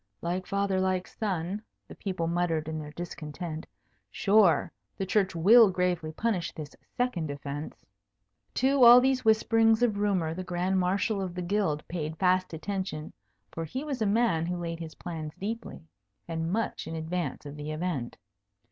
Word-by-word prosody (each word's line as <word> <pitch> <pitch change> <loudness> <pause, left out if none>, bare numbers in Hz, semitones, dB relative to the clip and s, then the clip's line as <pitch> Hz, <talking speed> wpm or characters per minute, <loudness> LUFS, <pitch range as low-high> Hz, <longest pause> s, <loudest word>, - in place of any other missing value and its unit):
"Like 180 +2 -2
father 200 -1 0
like 185 -1 0
son," 190 -1 -3 0.3
the - - -10
people 185 -4 -3
muttered 165 -2 0
in 160 0 -3
their 150 -1 -7
discontent. 160 0 -6 0.4
"Sure, 200 -4 +3 0.3
the 195 - -2
Church 190 -1 +1
will 210 +6 +7
gravely 180 -3 0
punish 185 -1 -1
this 150 -2 -8 0.2
second 220 - 0
offence." 145 +1 -6 0.7
To 265 0 +3
all 240 +1 +11
these 260 0 +2
whisperings 225 +1 +4
of 215 -4 +2
rumour 185 -6 +1
the 185 +2 -5
Grand 180 +1 0
Marshal 195 +3 +1
of 180 -2 -4
the 180 - -3
Guild 180 -5 0
paid 160 -2 -4
fast 185 0 +2
attention; 165 -2 -4 0.4
for 165 - -4
he 255 - -4
was 280 -5 -4
a 215 - +2
man 200 -6 +2
who 180 0 -2
laid 170 -1 -4
his 160 -2 -7
plans 160 -3 -6
deeply, 220 -4 -5 0.4
and 165 0 -2
much 225 +3 -2
in 165 - -4
advance 160 -2 -3
of 145 0 -7
the 150 0 -6
event. 155 -6 -3
180 Hz, 165 wpm, -28 LUFS, 160-205 Hz, 0.7 s, all